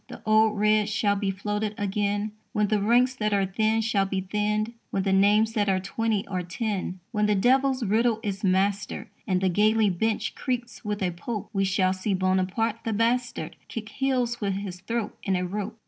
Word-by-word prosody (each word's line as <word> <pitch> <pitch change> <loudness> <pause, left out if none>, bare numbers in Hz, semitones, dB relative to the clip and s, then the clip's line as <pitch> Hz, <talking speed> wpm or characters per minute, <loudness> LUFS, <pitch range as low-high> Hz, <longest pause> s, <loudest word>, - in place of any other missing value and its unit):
The - - -11
old 215 0 +4
red 210 0 +3
shall 205 -1 +1
be 200 -1 -1
floated 210 +2 -2
again 205 +1 -1 0.2
When 210 -3 +1
the 210 -2 +2
ranks 245 +5 +4
that 215 -4 -1
are 195 -1 +2
thin 220 +3 +1
shall 210 -3 +1
be 190 0 -1
thinned, 210 +3 -1 0.2
When 195 - -1
the 195 0 +1
names 210 +3 +4
that 205 -2 +1
are 190 -1 +2
twenty 215 +2 -1
are 185 -2 -3
ten; 185 0 -3
When 210 -2 +1
the 210 - +3
devil's 260 +4 +3
riddle 220 +2 +2
is 200 -1 -3
mastered 195 +1 0 0.2
And 185 -2 +1
the 190 - +2
galley 215 +2 +3
bench 220 +5 -1
creaks 245 -2 -4
with 210 -2 -2
a 180 - +1
Pope, 210 +5 -5
We 195 -1 +1
shall 190 -1 +2
see 190 +1 -1
Buonaparte 190 +4 0
the 225 - -1
bastard 235 +2 0
Kick 220 -1 -6
heels 250 -3 -1
with 200 -2 0
his 190 -2 -5
throat 230 +3 -3
in 195 - 0
a 180 0 0
rope. 210 +4 -4
210 Hz, 195 wpm, -26 LUFS, 195-225 Hz, 0.2 s, old